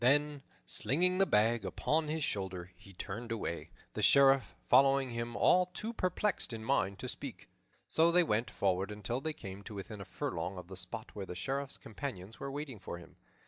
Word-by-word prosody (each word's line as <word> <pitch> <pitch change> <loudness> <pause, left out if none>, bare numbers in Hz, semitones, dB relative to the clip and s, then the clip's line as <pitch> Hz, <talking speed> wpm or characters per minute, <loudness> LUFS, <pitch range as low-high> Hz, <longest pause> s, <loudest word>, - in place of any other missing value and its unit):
Then, 145 +2 +3 0.2
slinging 180 - +3
the 195 - +5
bag 110 +2 +3
upon 150 - 0
his 155 +1 -1
shoulder, 95 -6 -2
he 100 - -15
turned 105 +5 -6
away, 100 -7 -3 0.2
the - - -3
Sheriff 135 -1 +5
following 135 0 +5
him, 115 0 -3
all 180 0 +5
too 215 +5 -5
perplexed 185 - 0
in 110 -1 -6
mind 105 -7 +1
to - - -5
speak. - - -5 0.4
So 165 +1 +4
they 175 +1 +6
went 110 -5 +1
forward 95 -1 0
until 105 +4 -3
they 155 +2 -2
came 95 -8 -8
to 105 +1 -9
within 100 +1 -7
a - - -7
furlong 90 +3 -3
of 90 0 -9
the 95 - -7
spot - - -5
where 100 -2 -6
the 90 - -6
Sheriff's 135 +9 -2
companions 110 -4 -7
were 140 - -4
waiting 140 -4 -5
for 90 -2 -6
him. 85 - -14
115 Hz, 190 wpm, -33 LUFS, 100-145 Hz, 0.4 s, they